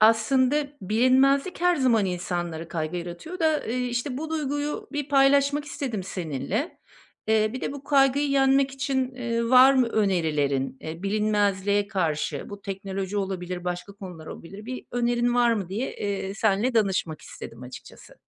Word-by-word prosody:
aslında, 255 Hz, +6 st, +4 dB, 0.2 s
bilinmezlik 260 Hz, -, +3 dB
her 355 Hz, 0 st, +3 dB
zaman 245 Hz, -7 st, +3 dB
insanları 175 Hz, -2 st, -3 dB
kaygı 160 Hz, 0 st, -3 dB
yaratıyor 175 Hz, -, -6 dB
da, 320 Hz, -2 st, +3 dB
ııı, -, -, -1 dB
işte, 250 Hz, +1 st, -2 dB
bu 315 Hz, +1 st, -5 dB
duyguyu 290 Hz, -1 st, -2 dB
bir 290 Hz, -1 st, -3 dB
paylaşmak 280 Hz, +1 st, +4 dB
istedim 255 Hz, -8 st, -4 dB
seninle. 185 Hz, -, -3 dB, 0.5 s
Eee, 215 Hz, -1 st, +3 dB
bir 255 Hz, -, -5 dB
de -, -, -3 dB
bu 280 Hz, -1 st, -9 dB
kaygıyı 280 Hz, 0 st, +3 dB
yenmek 270 Hz, 0 st, +3 dB
için, 265 Hz, -1 st, -2 dB
ııı, 235 Hz, -2 st, -1 dB
var 260 Hz, +1 st, +8 dB
mı 255 Hz, -2 st, +4 dB
önerilerin, 155 Hz, -11 st, 0 dB
eee, 160 Hz, +2 st, -7 dB
bilinmezliğe 205 Hz, -1 st, +1 dB
karşı? 155 Hz, -7 st, -2 dB
Bu 200 Hz, 0 st, -9 dB
teknoloji 195 Hz, 0 st, -4 dB
olabilir, 185 Hz, -2 st, -3 dB
başka 180 Hz, +3 st, -4 dB
konular 180 Hz, -5 st, -10 dB
olabilir. 195 Hz, +7 st, -9 dB
Bir 255 Hz, 0 st, -6 dB
önerin 240 Hz, 0 st, +1 dB
var 240 Hz, -1 st, +4 dB
mı 200 Hz, -6 st, -2 dB
diye, 215 Hz, +8 st, -3 dB
eee, 200 Hz, -1 st, -3 dB
seninle 220 Hz, +4 st, +1 dB
danışmak 190 Hz, -8 st, 0 dB
istedim 115 Hz, +2 st, -10 dB
açıkçası. 125 Hz, 0 st, -12 dB
220 Hz, 150 wpm, -25 LUFS, 185-270 Hz, 0.5 s, var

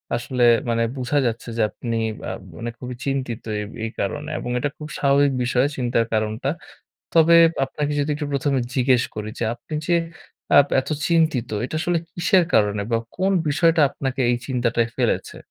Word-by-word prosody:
আসলে 125 Hz, +1 st, -1 dB, 0.3 s
মানে 115 Hz, 0 st, +1 dB
বুঝা 130 Hz, +3 st, -1 dB
যাচ্ছে 115 Hz, 0 st, -2 dB
যে -, -, +1 dB
আপনি 115 Hz, +1 st, -4 dB, 0.3 s
আ -, -, -2 dB, 0.3 s
মানে 120 Hz, -, -4 dB
খুবই 125 Hz, -1 st, -6 dB
চিন্তিত 130 Hz, -4 st, -2 dB, 0.2 s
এই -, -, -2 dB, 0.2 s
এই 110 Hz, -, -4 dB
কারণে 150 Hz, +9 st, -3 dB
এবং 125 Hz, -, -5 dB
এটা 145 Hz, -, -1 dB
খুব 150 Hz, -, -7 dB
স্বাভাবিক 140 Hz, 0 st, +3 dB
বিষয় 125 Hz, +1 st, +2 dB
চিন্তার 120 Hz, -2 st, +1 dB
কারণটা। 110 Hz, +4 st, -1 dB, 0.6 s
তবে 165 Hz, 0 st, +6 dB, 0.3 s
আপনাকে 145 Hz, +2 st, -3 dB
যদি 145 Hz, +1 st, 0 dB
একটু 150 Hz, 0 st, -4 dB
১ম 140 Hz, +1 st, 0 dB
এ -, -, -1 dB
জিজ্ঞেস 125 Hz, -1 st, +3 dB
করি 105 Hz, 0 st, -4 dB
যে -, -, -1 dB
আপনি 155 Hz, -, -11 dB
যে 175 Hz, -, +3 dB, 0.6 s
আ -, -, +9 dB, 0.2 s
এত 130 Hz, -, -6 dB, 0.2 s
চিন্তিত 160 Hz, -8 st, +2 dB, 0.2 s
এটা 145 Hz, -, -6 dB
আসলে 175 Hz, -1 st, +1 dB, 0.2 s
কিসের 175 Hz, +1 st, +3 dB
কারণে 105 Hz, -1 st, +3 dB
বা 115 Hz, -, +3 dB, 0.2 s
কোন 190 Hz, +2 st, +1 dB, 0.2 s
বিষয়টা 160 Hz, +2 st, +3 dB
আপনাকে 135 Hz, -1 st, -4 dB
এই -, -, +2 dB
চিন্তাটায় 120 Hz, -3 st, 0 dB
ফেলেছে? -, -, -1 dB
130 Hz, 175 wpm, -22 LUFS, 120-150 Hz, 0.6 s, আ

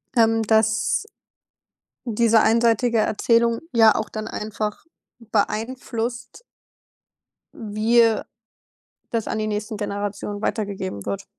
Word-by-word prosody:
Ähm, 225 Hz, -1 st, +3 dB
dass 220 Hz, 0 st, +2 dB, 1.0 s
diese 230 Hz, -1 st, +3 dB
einseitige 230 Hz, +1 st, +3 dB
Erzählung 230 Hz, +2 st, +2 dB
ja 225 Hz, -2 st, +6 dB
auch 215 Hz, -, -2 dB
dann 215 Hz, 0 st, -5 dB
einfach 210 Hz, +2 st, -4 dB, 0.3 s
beeinflusst 235 Hz, -, -3 dB, 1.1 s
wie, 220 Hz, +2 st, +1 dB
äh, 225 Hz, -2 st, +2 dB, 0.9 s
das 230 Hz, -2 st, -2 dB
an -, -, -2 dB
die 215 Hz, -, -1 dB
nächsten 215 Hz, +1 st, -3 dB
Generationen 205 Hz, 0 st, -4 dB
weitergegeben 195 Hz, -, -3 dB
wird. 100 Hz, -1 st, -3 dB
220 Hz, 100 wpm, -22 LUFS, 210-230 Hz, 1.1 s, ja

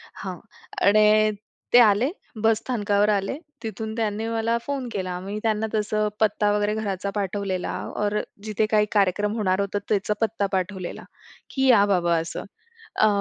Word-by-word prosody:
हां, -, -, -6 dB, 0.5 s
आणि 215 Hz, +1 st, +5 dB, 0.4 s
ते 245 Hz, -, +9 dB
आले 225 Hz, +2 st, +5 dB, 0.3 s
बसस्थानकावर 215 Hz, -2 st, +2 dB
आले. 200 Hz, +5 st, 0 dB, 0.3 s
तिथून 220 Hz, 0 st, -4 dB
त्यांनी 220 Hz, -1 st, -1 dB
मला 230 Hz, 0 st, 0 dB
फोन 275 Hz, -3 st, -3 dB
केला. 185 Hz, -3 st, -3 dB
मी 200 Hz, +3 st, -5 dB
त्यांना 220 Hz, 0 st, +1 dB
तसं 215 Hz, 0 st, 0 dB
पत्ता 210 Hz, -1 st, +2 dB
वगैरे 210 Hz, 0 st, +1 dB
घराचा 200 Hz, -2 st, -2 dB
पाठवलेला 195 Hz, -2 st, -2 dB, 0.3 s
और 210 Hz, 0 st, +1 dB, 0.2 s
जिथे 215 Hz, 0 st, 0 dB
काही 210 Hz, -1 st, +4 dB
कार्यक्रम 205 Hz, +1 st, +2 dB
होणार 190 Hz, -3 st, +1 dB
होतं 200 Hz, +1 st, -1 dB
त्याचा 210 Hz, 0 st, +1 dB
पत्ता 220 Hz, -2 st, 0 dB
पाठवलेला, 185 Hz, -1 st, -3 dB, 0.5 s
की 265 Hz, -1 st, 0 dB
या 225 Hz, -6 st, +6 dB
बाबा 175 Hz, -4 st, +2 dB
असं. 165 Hz, +1 st, -4 dB, 0.5 s
अ, 215 Hz, -, +4 dB
210 Hz, 145 wpm, -24 LUFS, 200-220 Hz, 0.5 s, ते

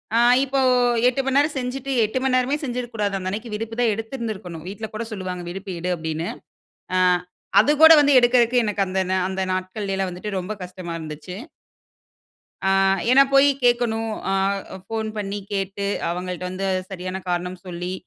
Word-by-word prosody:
அ, -, -, +4 dB, 0.3 s
இப்போ 270 Hz, 0 st, 0 dB, 0.5 s
8 255 Hz, +2 st, +1 dB
மணி 270 Hz, +1 st, +1 dB
நேர 290 Hz, -, +5 dB
செஞ்சிட்டு, 260 Hz, +1 st, -3 dB
8 220 Hz, +4 st, -3 dB
மணி 265 Hz, -1 st, +2 dB
நேரமே 255 Hz, +3 st, +1 dB
செஞ்சிருக்க 245 Hz, -3 st, -4 dB
கூடாது. 205 Hz, -2 st, -1 dB
அந்த 185 Hz, -1 st, -3 dB
அன்னைக்கு 215 Hz, +4 st, -5 dB
விடுப்பு 225 Hz, +1 st, -4 dB
தா 245 Hz, -, +3 dB
எடுத்திருந்திருக்கணும் 215 Hz, -, -6 dB
வீட்ல 210 Hz, +3 st, -6 dB
கூட 220 Hz, +2 st, -3 dB
சொல்லுவாங்க. 185 Hz, -3 st, -5 dB
விடுப்பு 195 Hz, +2 st, -6 dB
எடு, 180 Hz, +2 st, -3 dB
அப்டினு. 160 Hz, +1 st, -3 dB, 0.7 s
ஆ, -, -, +3 dB, 0.6 s
அது 295 Hz, -, +4 dB
கூட 320 Hz, 0 st, +11 dB
வந்து 285 Hz, 0 st, +4 dB
எடுக்கறதுக்கு, 240 Hz, 0 st, +4 dB
எனக்கு 205 Hz, -2 st, 0 dB
அந்த 190 Hz, +1 st, -1 dB
நா 190 Hz, -, +2 dB
அந்த 190 Hz, 0 st, -2 dB
நாட்கள்லேலா 190 Hz, +1 st, -2 dB
வந்துட்டு, 195 Hz, +3 st, -5 dB
ரொம்ப 180 Hz, +4 st, -5 dB
கஷ்டமா 180 Hz, -1 st, -7 dB
இருந்துச்சு. 155 Hz, +2 st, -8 dB, 1.3 s
ஆ, 190 Hz, -, +2 dB, 0.4 s
ஏனா 270 Hz, +2 st, +8 dB
போயி 275 Hz, +1 st, +7 dB, 0.2 s
கேட்கணும். 235 Hz, -2 st, +2 dB, 0.2 s
அ, -, -, +1 dB, 0.5 s
ஃபோன் 220 Hz, +1 st, -3 dB
பண்ணி 205 Hz, -1 st, -3 dB
கேட்டு, 195 Hz, 0 st, -2 dB, 0.2 s
அவங்கள்ட்ட 180 Hz, +1 st, -4 dB
வந்து, 190 Hz, +1 st, -3 dB, 0.2 s
சரியான 185 Hz, 0 st, -5 dB
காரணம் 180 Hz, +1 st, -2 dB
சொல்லி, 180 Hz, 0 st, -5 dB
205 Hz, 165 wpm, -23 LUFS, 185-240 Hz, 1.3 s, கூட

